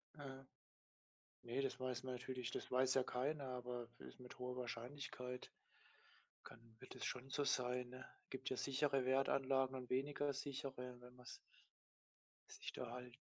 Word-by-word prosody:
Aha, 135 -2 -6 1.0
ne, 120 +3 +1
das 135 -1 0
weiß 130 -1 0
man 130 -1 -1
natürlich 125 -1 -2
das - - -2
weiß 130 +1 +6
ja 130 - +6
keiner, 140 +4 +1
aber 125 -2 -2
ist - - -9
mit 125 0 -9
hoher 125 0 -1
Wahrscheinlichkeit 125 +1 -3 0.9
kann - - -9 0.2
wird - - -9
es - - -2
schon 130 +1 -1
so 145 +1 +2
sein, 125 -1 +3
ne? 130 +1 -7 0.2
Gibt 130 0 -2
ja 130 - 0
sichere 135 -1 +3
Wertanlagen 135 0 +4
und 125 -1 -4
weniger 140 +2 +2
sichere, 130 -3 -3
wenn 125 0 -11
man's 125 -1 -8 1.2
sich - - -4
da 125 - -2
halt 125 0 -5
130 Hz, 155 wpm, -44 LUFS, 125-135 Hz, 1.2 s, weiß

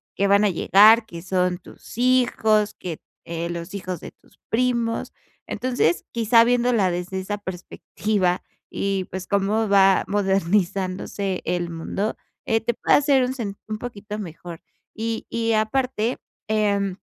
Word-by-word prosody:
que 200 - +1
van 200 +1 +4
a - - +4
llegar, 215 +5 +6
que 170 -1 -8
son 180 -1 0
tus 190 - -14
hijos, 240 -4 +2
que, 170 -4 -6 0.3
eh, 170 0 -4
los 170 +2 -6
hijos 185 -3 -5
de - - -9
tus - - -28
primos. 235 -1 0 0.4
Entonces 210 -10 0
quizá 230 0 +4
viéndola 240 -5 +2
desde 180 +2 -3
esa 205 +2 -3
perspectiva 185 0 -2 0.3
y, 195 -1 -2
pues, 185 0 -5
cómo 205 +2 +1
va 195 -1 +5
modernizándose 195 -1 0
el 175 -1 -1
mundo, 195 +6 -3 0.3
eh, 225 0 +1
te 235 +2 0
puede - - +3
hacer 280 -2 +3
un 255 - -2
sen 210 -6 -5
un 215 0 -3
poquito 210 -3 -6
mejor 170 -3 -8 0.3
y 225 0 -3
y 230 0 0
aparte, 230 +2 0 0.3
em, 200 -3 0
200 Hz, 145 wpm, -23 LUFS, 185-225 Hz, 0.4 s, llegar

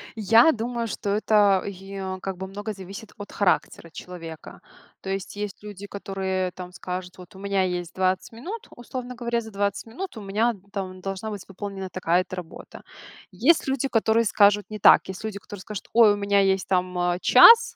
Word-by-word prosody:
Я 225 +7 +6
думаю, 235 -2 -3
что 205 - -4
это, 205 -2 +3
йе 195 -1 -6
как 190 -2 -4
бы 190 +1 -5
много 205 +3 -5
зависит 195 +3 -10
от 205 -1 -9
характера 180 -3 0
человека. 165 -3 -9 0.4
То - - -7
есть 195 0 -4
есть 205 -1 -5
люди, 205 -1 -8
которые 190 -2 -3
там 180 0 -9
скажут: 180 -1 -6
"Вот 180 +2 -14
у - - -11
меня 200 -1 0
есть 180 -2 -3
20 185 0 0
минут, 350 - -7
условно 250 +1 -7
говоря, 235 -1 -1
за 220 -1 -10
20 200 0 -1
минут 305 +6 -7
у - - -6
меня, 210 +4 +1
н 205 -5 -12
там 185 -2 -5
должна 195 +3 -4
быть 205 -3 -6
выполнена 195 0 -6
такая-то 180 +1 0
работа". 180 -2 -10 0.5
Есть 335 -4 +3
люди, 270 0 0
которые 225 -1 +2
скажут 205 0 +4
не 215 0 -6
так. - - +7
Есть 190 +3 -7
люди, 215 -2 -4
которые 200 0 -10
скажут: 205 0 -7
"Ой, 225 -3 +7
у - - -3
меня 200 0 +2
есть 190 -1 +2
там, 180 -1 0
а, 175 0 0
час, 460 - +8
200 Hz, 190 wpm, -25 LUFS, 185-220 Hz, 0.5 s, час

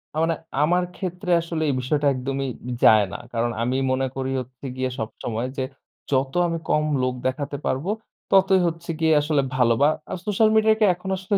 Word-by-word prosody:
আ - - -3
মানে 165 0 +1 0.3
আমার 180 +4 +3
ক্ষেত্রে 180 0 -4
আসলে 165 -1 -4
এই 140 - +1
বিষয়টা 145 +3 +1
একদমই 135 +1 -3 0.2
উম - - -3
যায় 110 -2 +7
না - - -5
কারণ 120 +1 0
আমি 125 +2 0
মনে 130 0 +1
করি 135 0 -2
হচ্ছে 130 +2 -9
গিয়ে 130 0 0
সবসময় 115 +2 -4
যে, 130 - 0 0.5
"যত 135 0 +1
আমি 165 - -2
কম 150 - +3 0.2
লোক 130 0 +1
দেখাতে 140 +2 -3
পারবো, 135 +8 -1 0.4
ততই 190 -1 +5
হচ্ছে 165 +1 -5
গিয়ে 160 -1 +3
আসলে 150 -1 +1
ভালো।" 120 -2 +4
বা 145 - +6 0.2
আ - - -2
social 215 +1 +3
media 220 0 +5
কে 215 - +5
এখন 180 +2 -8
আসলে 190 +2 -1
145 Hz, 195 wpm, -23 LUFS, 130-175 Hz, 0.5 s, যায়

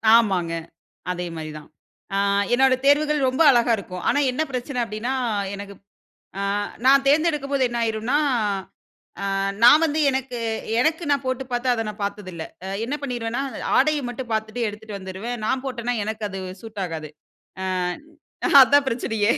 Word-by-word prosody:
ஆமாங்க. 185 -7 +2 0.6
அதே 180 0 -3
மாரி 155 -1 -6
தான். 150 - -17 0.5
ஆ - - +2 0.4
என்னுடைய 265 +1 +4
தேர்வுகள் 300 +1 +4
ரொம்ப 260 +5 0
அழகா 240 -1 +3
இருக்கும். 185 -3 -7
ஆனா, 285 - +2
என்ன 255 - -2
பிரச்சனை 250 +1 -3
அப்டினா, 225 +4 -3 0.4
எனக்கு 200 0 -8 0.6
அ - - -2 0.5
நான் 275 +1 +6
தேர்ந்தெடுக்கும்போது 285 -3 +2
என்ன 240 0 -3
ஆயிரும்னா, 225 +4 0 1.1
அ - - -2 0.4
நான் 295 +7 +8
வந்து 310 0 0
எனக்கு- 260 -2 -3 0.4
எனக்கு 320 +5 +1
நான் 280 -1 +1
போட்டு 260 +1 -1
பார்த்து 245 +1 -1
அத 225 -2 -1
நான் 210 0 -8
பார்த்ததில்லை, 185 -5 -5 0.4
என்ன 265 - -3
பண்ணிருவேனா 245 -1 -2 0.4
ஆடைய 300 +2 +3
மட்டும் 245 0 -7
பார்த்துட்டு 220 +2 -1
எடுத்துட்டு 210 -1 -7
வந்துருவேன், 190 +6 -5
நான் 260 +2 -1
போட்டேனா 245 -2 -2
எனக்கு 220 0 -4
அது 195 0 -5 0.2
சூட் 210 -3 -6
ஆகாது. 160 -3 -6 0.5
அ - - -2 1.0
அதுதான் 280 +2 +6
பிரச்சனையே! 225 -2 +1
240 Hz, 145 wpm, -23 LUFS, 210-270 Hz, 1.1 s, நான்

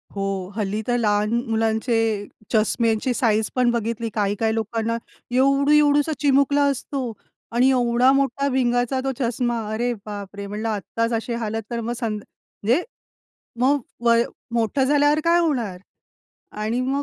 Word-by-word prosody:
हो, 195 -1 -3
हल्ली 210 0 -1
तर 245 - +2
लहान 210 -2 +1
म 235 0 -1
मुलांचे 225 +1 +1 0.5
चष्म्यांची 225 +2 +2
साइझ 220 -3 +2
पण 250 -1 +3
बघितली, 230 0 -2
काही-काही 210 +1 0
लोकांना 225 +1 -1 0.4
एवढू 275 +2 +3
एवढूसा 295 0 +4
चिमुकला 280 0 +3
असतो 265 -1 -4 0.4
आणि 250 +3 +4
एवढा 245 0 +3
मोठा 275 0 +1
भिंगाचा 245 0 +1
तो 270 - 0
चष्मा, 240 -1 0
अरे 240 +2 0
बापरे! 200 -1 -7
म्हंटलं 210 +3 -3
आत्ताच 230 +2 -2
अशी 230 +1 -2
हालत. 225 -1 -2
तर 235 - -2
मग, 235 +2 -3
संद 215 -4 -3 0.4
जे, 260 +9 +4 0.8
मग 280 +3 +3 0.3
वय, 235 0 +5 0.3
मोठं 235 +4 +1
झाल्यावर 290 +2 +3
काय 340 +1 +4
होणार? 240 - -1 0.7
आणि 215 +3 -2
मग, 270 +3 0
235 Hz, 140 wpm, -23 LUFS, 220-265 Hz, 0.8 s, वय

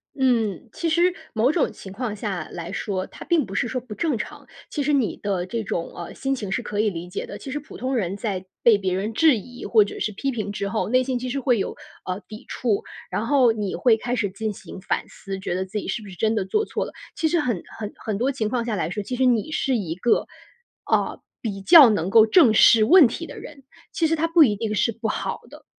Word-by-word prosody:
嗯。 235 - +1
其 335 - -2
实 345 +3 +3 0.2
某 230 +5 +3
种 315 - +1
情 190 - -11
况 215 +1 -4
下 195 -6 -4
来 170 0 -6
说， 190 -1 -3
它 - - -11
并 335 -3 +2
不 195 - -9
是 240 - +1
说 255 +2 -2
不 235 -3 -9
正 305 -8 0
常。 - - -7 0.2
其 295 - -3
实 295 +2 +1
你 265 -6 +1
的 190 -3 -2
这 225 +4 -3
种， 170 -4 -3
呃， 170 - -7
心 270 0 -1
情 205 -6 -5
是 - - 0
可 210 0 -4
以 215 - +3
理 175 -2 -6
解 180 - -4
的。 - - -8
其 270 - -8
实 295 - -2
普 290 - -12
通 260 +1 -2
人 195 -4 -1
在 190 -3 -3 0.2
被 230 -3 +6
别 190 -2 -1
人 200 +4 -2
质 295 0 +5
疑 245 +5 -9
或 220 -3 +5
者 205 - -7
是 215 - -1
批 270 +7 -2
评 215 -4 -3
之 200 0 -3
后， 215 +1 -1
内 255 +2 +3
心 255 -1 -1
其 255 +1 -4
实 275 - -2
会 245 -4 +2
有， - - -3 0.3
呃， 185 +1 -3
抵 215 0 -10
触。 220 -5 -1 0.3
然 220 - -1
后 250 -2 +4
你 210 -3 -3
会 235 -3 +4
开 245 +2 -2
始 205 -4 0
进 215 +3 -4
行 190 - -10
反 - - -2
思， 195 -2 -7
觉 190 - -3
得 185 +1 -1
自 195 +3 -6
己 - - -7
是 225 - -2
不 205 - -11
是 180 - -10
真 220 +4 +1
的 200 -3 0
做 425 - 0
错 - - -3
了。 - - -8 0.2
其 320 - +1
实 340 +2 +2
很 240 - -1
很 210 -2 -5
很 215 -3 -3
多 255 +6 +1
情 220 -5 -2
况 240 0 -1
下 225 - -1
来 165 -4 -1
说， 205 +4 -4
其 250 +5 -4
实 260 - +2
你 250 +4 +2
是 270 -4 0
一 185 -8 -2
个， 235 +5 +1 0.6
呃， - - 0 0.2
比 200 -4 -4
较 300 - +9
能 190 -4 0
够 220 +1 +7
正 240 -1 +5
视 220 0 +7
问 325 - +8
题 285 +8 -5
的 - - -10
人。 285 -3 -11 0.3
其 330 - +1
实 325 - +1
它 320 +1 0
不 330 -1 +6
一 215 -7 +3
定 215 +1 -3
是 230 - +2
不 225 +1 -4
好 - - -3
的， - - -14
225 Hz, 280 characters per minute, -23 LUFS, 200-260 Hz, 0.6 s, 较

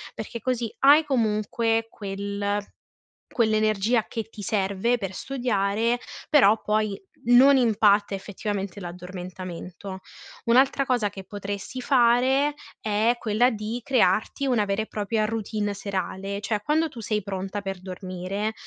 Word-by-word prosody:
perché 225 +2 -6
così 240 -3 -2
hai 290 +3 +7
comunque 225 -2 +1
quel 200 0 -3 0.7
quell'energia 215 -1 +2
che 225 - -4
ti 220 - -10
serve 205 +2 0
per 195 -4 -5
studiare, 230 -2 0 0.3
però 225 -8 +6
poi 210 -2 0 0.3
non 260 +3 +7
impatta 210 -4 +3
effettivamente 200 0 -4
l'addormentamento. 180 +1 -7 0.5
Un'altra 265 +3 +4
cosa 230 -6 +1
che 195 -1 -9
potresti 205 +5 -6
fare 260 +3 +3 0.3
è 215 +3 +2
quella 230 +3 +2
di 220 +2 -4
crearti 250 +2 +2
una 235 -5 +2
vera 200 +1 0
e 220 - -5
propria 215 +1 -1
routine 215 -1 -2
serale, 195 0 -4
cioè 210 0 -1
quando 315 +5 +1
tu 245 -5 -9
sei 210 0 -1
pronta 195 +1 -4
per 195 -2 -5
dormire, 185 +3 -4
215 Hz, 125 wpm, -25 LUFS, 200-235 Hz, 0.7 s, hai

